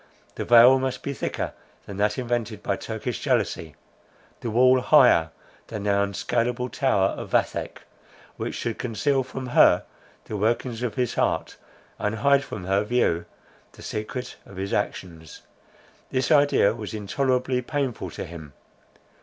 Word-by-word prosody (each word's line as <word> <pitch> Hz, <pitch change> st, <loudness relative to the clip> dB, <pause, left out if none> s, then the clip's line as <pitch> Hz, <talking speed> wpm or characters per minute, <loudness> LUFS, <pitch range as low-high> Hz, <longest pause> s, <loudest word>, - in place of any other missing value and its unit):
The -, -, -5 dB
veil 120 Hz, +3 st, +7 dB
must 130 Hz, -1 st, -3 dB
be 140 Hz, -, -3 dB
thicker 130 Hz, -, -3 dB, 0.3 s
than 100 Hz, -, -8 dB
that 105 Hz, +1 st, +1 dB
invented 120 Hz, -4 st, -3 dB
by 100 Hz, -, 0 dB
Turkish 110 Hz, +4 st, -5 dB
jealousy; 100 Hz, -, -1 dB, 0.6 s
the 115 Hz, -, -4 dB
wall 130 Hz, +3 st, +5 dB
higher 125 Hz, -, +5 dB, 0.4 s
than 105 Hz, -3 st, -6 dB
the 105 Hz, -, +1 dB
unscaleable 120 Hz, +5 st, -1 dB
tower 100 Hz, -8 st, +2 dB
of -, -, -6 dB
Vathek, -, -, -1 dB, 0.5 s
which -, -, -4 dB
should 115 Hz, -2 st, -4 dB
conceal 135 Hz, +3 st, 0 dB
from 130 Hz, 0 st, -6 dB
her -, -, +5 dB, 0.4 s
the 105 Hz, -, -5 dB
workings 115 Hz, +3 st, -1 dB
of 125 Hz, -3 st, -2 dB
his 125 Hz, -3 st, -1 dB
heart, -, -, -1 dB, 0.4 s
and 105 Hz, +1 st, -1 dB
hide 140 Hz, +3 st, +3 dB
from 100 Hz, -8 st, -7 dB
her 95 Hz, +2 st, +1 dB
view 105 Hz, -7 st, +1 dB, 0.5 s
the -, -, -13 dB
secret 125 Hz, +4 st, -5 dB
of 100 Hz, -, -14 dB
his 95 Hz, +1 st, -3 dB
actions. 85 Hz, -6 st, -4 dB, 0.7 s
This 130 Hz, +1 st, -1 dB
idea 145 Hz, -8 st, +4 dB
was 110 Hz, -1 st, -6 dB
intolerably 125 Hz, +4 st, 0 dB
painful 130 Hz, -, -3 dB
to 75 Hz, -, -6 dB
him. 80 Hz, -4 st, -10 dB
115 Hz, 145 wpm, -25 LUFS, 100-130 Hz, 0.7 s, veil